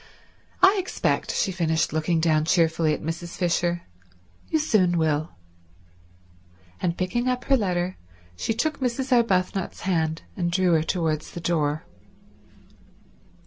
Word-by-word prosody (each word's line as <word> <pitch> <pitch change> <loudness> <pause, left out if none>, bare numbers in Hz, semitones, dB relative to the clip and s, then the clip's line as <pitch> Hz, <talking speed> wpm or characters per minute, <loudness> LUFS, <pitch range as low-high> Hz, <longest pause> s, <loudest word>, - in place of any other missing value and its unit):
I 385 +2 +7
expect," 375 - -1
she 195 - 0
finished 160 -4 0
looking 160 +1 +1
down 155 -2 +2
cheerfully 165 -2 +2
at - - -9
Mrs. 170 +2 -5
Fisher, 175 -1 0 0.7
"you 315 - +2
soon 195 - +2
will." 155 -1 0 1.5
And 170 -1 -1
picking 240 +7 -1
up 250 0 0
her 275 - +3
letter 185 -5 -1 0.4
she 220 - -2
took 305 +6 -1
Mrs. 260 +1 -2
Arbuthnot's 195 -6 +1
hand 160 -3 -1
and 175 -2 -1
drew 180 0 +2
her 160 - +4
towards 160 -2 -1
the - - -7
door. 155 -3 0
175 Hz, 130 wpm, -25 LUFS, 160-205 Hz, 1.5 s, I